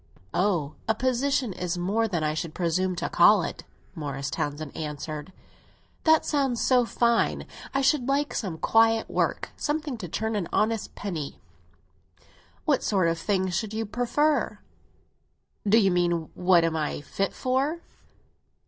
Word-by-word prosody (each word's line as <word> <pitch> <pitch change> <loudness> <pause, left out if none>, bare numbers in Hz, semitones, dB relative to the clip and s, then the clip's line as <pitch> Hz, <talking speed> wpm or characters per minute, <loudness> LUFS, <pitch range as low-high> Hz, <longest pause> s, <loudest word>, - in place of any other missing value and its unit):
"Oh, 175 -7 +1
a 220 - +2
position 255 -1 0
is 180 0 -3
more 205 +6 +1
than 175 -6 -1
I 155 0 +1
should 160 0 -4
presume 180 +1 0
to 170 - -2
call 185 +2 +5
it," - - -6 0.3
Morris 145 -4 -4
Townsend 145 0 -3
answered. 150 +2 -5 0.7
"That 320 -1 +5
sounds 270 -5 +1
so 250 -2 +3
fine. 235 0 +1 0.3
I 275 - +1
should 265 -2 +2
like 285 +2 +1
some 185 -7 -3
quiet 225 +4 +3
work—something 295 -4 -1
to 185 - -5
turn 220 +6 -2
an 190 -5 -1
honest 220 0 0
penny." 165 -8 -5 1.3
"What - - +2
sort 185 -5 +2
of 165 0 -1
thing 190 -2 0
should 210 +4 -2
you 225 0 -1
prefer?" 245 +8 +1 1.1
"Do 220 - +6
you 195 -4 +4
mean 175 -2 0
what 180 -2 +4
am 165 -1 0
I 150 -2 -2
fit 195 +6 -2
for? 275 +6 -1
195 Hz, 145 wpm, -26 LUFS, 170-240 Hz, 1.3 s, Do